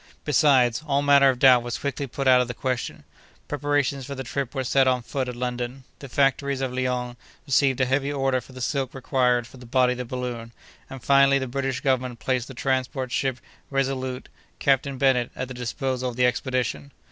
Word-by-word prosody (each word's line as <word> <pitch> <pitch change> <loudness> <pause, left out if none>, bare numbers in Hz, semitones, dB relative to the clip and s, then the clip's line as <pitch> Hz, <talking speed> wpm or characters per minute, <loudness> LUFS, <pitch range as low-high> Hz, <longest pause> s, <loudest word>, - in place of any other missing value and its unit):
Besides, 135 -5 +3
all 140 0 +1
manner 140 -1 +6
of 130 - 0
doubt 125 -1 +6
was 120 -2 -4
quickly 140 +3 -3
put 135 +2 -3
out 125 -1 +6
of 125 - -1
the 125 - -5
question: 130 -2 -3 0.4
preparations 145 -1 0
for 140 +2 -6
the 135 - -5
trip 135 +2 -4
were 135 - -1
set 135 +1 +3
on 125 -2 +1
foot 130 +2 -3
at 125 - -6
London; 125 +1 -4 0.2
the 140 - -9
factories 140 +1 +1
of 130 -2 -2
Lyons 125 -1 -2 0.3
received 135 -2 +2
a 130 - +3
heavy 135 +2 0
order 135 -2 0
for 125 - -16
the 130 0 -9
silk 135 0 -2
required 125 -2 +1
for 130 - -15
the 125 -1 -12
body 125 +1 +3
of 125 - -4
the 125 - -3
balloon; 120 -2 -5 0.4
and, 135 -2 -9
finally, 140 0 +5
the 135 - -2
British 130 0 -3
Government 130 -4 0
placed 130 +1 -1
the 135 - -10
transport 130 0 -1
ship 130 -1 0 0.3
Resolute, 130 -2 -2 0.3
Captain 135 0 +1
Bennett, 130 -3 +2
at 130 - -4
the - - -6
disposal 125 +1 -3
of 120 - -8
the 125 0 +3
expedition. 125 +2 -1
130 Hz, 205 wpm, -24 LUFS, 125-135 Hz, 0.4 s, manner